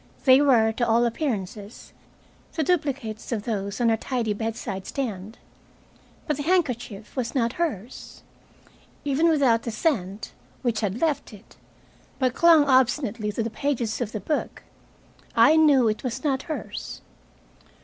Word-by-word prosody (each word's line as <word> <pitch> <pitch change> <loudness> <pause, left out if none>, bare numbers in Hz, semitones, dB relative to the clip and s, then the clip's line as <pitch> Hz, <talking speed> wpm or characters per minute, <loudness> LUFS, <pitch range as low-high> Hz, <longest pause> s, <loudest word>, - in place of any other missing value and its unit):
They 260 +1 +7
were, 235 -6 +4
to 235 +1 -1
all 235 +1 +3
appearances, 220 - -4 0.6
the 320 - 0
duplicates 275 -10 -2
of 220 -3 -2
those 200 -2 -3
on 235 -1 +3
her 225 - +2
tidy 230 -3 -2
bedside 210 -3 -4
stand. 220 -5 -4 0.9
But 300 -3 -1
the - - -3
handkerchief 250 - -1
was 255 -2 -3
not 235 -2 +1
hers. 255 - -5 0.8
Even 290 +4 +2
without 265 -8 +3
the 235 - -5
scent, 215 - -2 0.3
which 235 -3 0
had 210 +1 -2
left 305 -7 -1
it, 210 +1 -15 0.6
but 255 -2 +1
clung 330 -2 +6
obstinately 250 -5 +2
to 230 - -1
the 230 - -4
pages 240 -3 -2
of 225 -3 -2
the 215 - -4
book, 295 +10 -3 0.7
I 305 - +6
knew 290 -6 +5
it 215 0 -1
was 255 0 -4
not 270 -3 0
hers. 310 - -6
240 Hz, 145 wpm, -25 LUFS, 220-280 Hz, 0.9 s, They